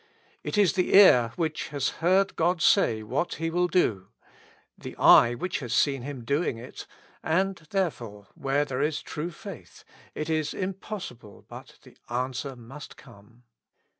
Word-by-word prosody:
It - - -3
is 205 -3 +4
the 185 -1 +1
ear 125 - +7
which 160 -3 -2
has 140 -2 -2
heard 190 +4 +2
God 175 +2 +1
say 115 - +3
what 130 +10 -2
He 165 +1 -3
will 180 +1 +1
do, 110 - 0 0.7
the - - -10
eye 120 +1 +6
which 170 +6 -3
has 125 -5 -3
seen 135 -3 +2
Him 130 -2 -7
doing 140 -1 -1
it, 120 - -10 0.3
and, 190 +4 0
therefore, 120 - -3
where 140 +2 -1
there 135 -1 -3
is 150 +1 -1
true 155 +3 -5
faith, 170 - -11 0.3
it 155 - -4
is 155 -2 -1
im 190 0 -2
possible 150 - -9
but - - -12
the - - -17
answer 130 +2 -3
must 125 +5 -12
come. 115 -1 -18
145 Hz, 160 wpm, -26 LUFS, 120-175 Hz, 0.7 s, ear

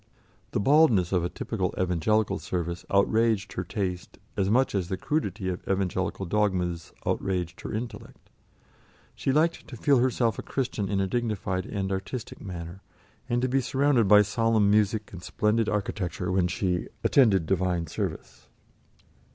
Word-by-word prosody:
The - - -1
baldness 120 - +4
of 90 -3 +2
a 90 - -1
typical - - -3
Evangelical 95 +3 +1
service 85 -1 -3
outraged 110 +1 +2
her 90 - -3
taste 90 -1 -4 0.2
as 95 0 +1
much 130 +5 +3
as 95 -4 -1
the 95 - -2
crudity 145 -9 -2
of 90 -1 -3
Evangelical 95 0 -1
dogmas 90 -4 -1
outraged 90 -3 -2
her - - -6
intellect; 115 +2 -7 0.8
she - - -1
liked 160 +4 +1
to 120 - -9
feel 140 +1 +3
herself 120 -3 +1
a - - -2
Christian 125 -7 -2
in 100 -2 0
a 95 - +2
dignified 100 -4 -2
and 95 -1 -3
artistic 95 +5 -5
manner, 90 0 -7 0.5
and 120 0 +1
to - - +3
be 135 +1 +1
surrounded 130 -2 +2
by 105 +1 +7
solemn 110 0 +2
music 105 0 +1
and 90 - -8
splendid 105 +4 0
architecture 95 -3 -2
when 90 -1 +2
she 90 0 -1 0.2
"attended 105 - +4
Divine 90 -2 0
service." - - -5
100 Hz, 150 wpm, -27 LUFS, 90-115 Hz, 0.8 s, by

